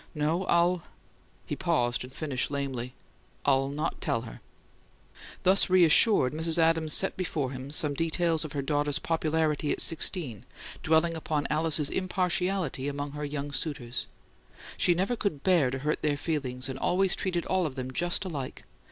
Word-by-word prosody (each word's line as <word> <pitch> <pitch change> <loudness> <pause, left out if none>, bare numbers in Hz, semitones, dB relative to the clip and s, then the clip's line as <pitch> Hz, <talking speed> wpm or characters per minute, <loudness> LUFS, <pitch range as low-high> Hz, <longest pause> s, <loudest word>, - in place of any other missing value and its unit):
"No, 155 +5 0
I'll 175 +1 +2 0.3
" - - -34
He - - -4
paused, 135 -11 0
and 125 - -10
finished 135 -3 -2
lamely: 135 -3 -4 0.5
"I'll 135 -1 +3
not 150 +3 -3
tell 115 - 0
her." - - -11 1.0
Thus 190 +1 +5
reassured, 180 - +5
Mrs. 160 +1 +2
Adams 165 -1 +2
set 190 - +1
before 155 -7 -2
him 130 +1 -7
some 150 0 0
details 165 +1 0
of 155 - -7
her 140 -2 -2
daughter's 145 +1 0
popularity 160 -2 0
at - - -1
sixteen, 160 - +2 0.4
dwelling 160 +1 +2
upon 155 -2 -2
Alice's 155 -1 +3
impartiality 180 -5 -1
among 145 0 -4
her 150 +1 -6
young 145 0 -4
suitors: 130 -4 -3 0.7
"She 175 - +3
never 195 +8 0
could 195 -11 -3
BEAR 175 -8 +3
to 130 - -3
hurt 150 +3 -2
their 150 -2 0
feelings, 130 -5 -3
and 135 0 -6
always 190 +4 +1
treated 175 -3 -1
all 185 -3 +1
of 135 - -8
them 130 -1 -5
just 175 +7 0
alike. 145 -8 -6
155 Hz, 160 wpm, -28 LUFS, 140-170 Hz, 1.0 s, Thus